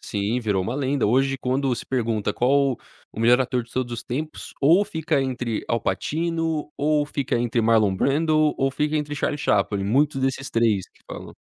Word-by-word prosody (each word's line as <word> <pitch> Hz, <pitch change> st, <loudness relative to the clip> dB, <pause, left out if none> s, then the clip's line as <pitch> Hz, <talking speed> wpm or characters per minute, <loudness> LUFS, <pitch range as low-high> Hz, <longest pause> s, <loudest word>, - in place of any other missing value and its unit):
Sim, 105 Hz, +4 st, -2 dB
virou 105 Hz, -5 st, 0 dB
uma 115 Hz, +7 st, -3 dB
lenda. 135 Hz, -3 st, 0 dB
Hoje, 135 Hz, +4 st, +2 dB
quando 130 Hz, 0 st, 0 dB
se -, -, -8 dB
pergunta: 115 Hz, -5 st, -1 dB
"Qual 135 Hz, +1 st, +2 dB, 0.4 s
o 110 Hz, -, -7 dB
melhor 120 Hz, +2 st, +5 dB
ator 125 Hz, -1 st, 0 dB
de 115 Hz, -, -18 dB
todos 125 Hz, -2 st, -2 dB
os 115 Hz, -, -5 dB
tempos?", 150 Hz, +5 st, -5 dB
ou 170 Hz, +9 st, +5 dB
fica 160 Hz, -5 st, -1 dB
entre 120 Hz, -4 st, -3 dB
Al 115 Hz, -, 0 dB
Pacino, 160 Hz, -, -2 dB
ou 150 Hz, 0 st, +1 dB
fica 140 Hz, -5 st, -2 dB
entre 120 Hz, 0 st, 0 dB
Marlon 110 Hz, -3 st, +3 dB
Brando, 155 Hz, +6 st, +2 dB
ou 135 Hz, 0 st, +1 dB
fica 150 Hz, +2 st, -1 dB
entre 150 Hz, -1 st, -2 dB
Charlie 145 Hz, 0 st, -2 dB
Chaplin, 100 Hz, -4 st, +1 dB
muitos 135 Hz, +5 st, +1 dB
desses 135 Hz, 0 st, -2 dB
3, 110 Hz, -5 st, +1 dB
que -, -, -29 dB
falam. -, -, -8 dB
130 Hz, 190 wpm, -23 LUFS, 115-145 Hz, 0.4 s, melhor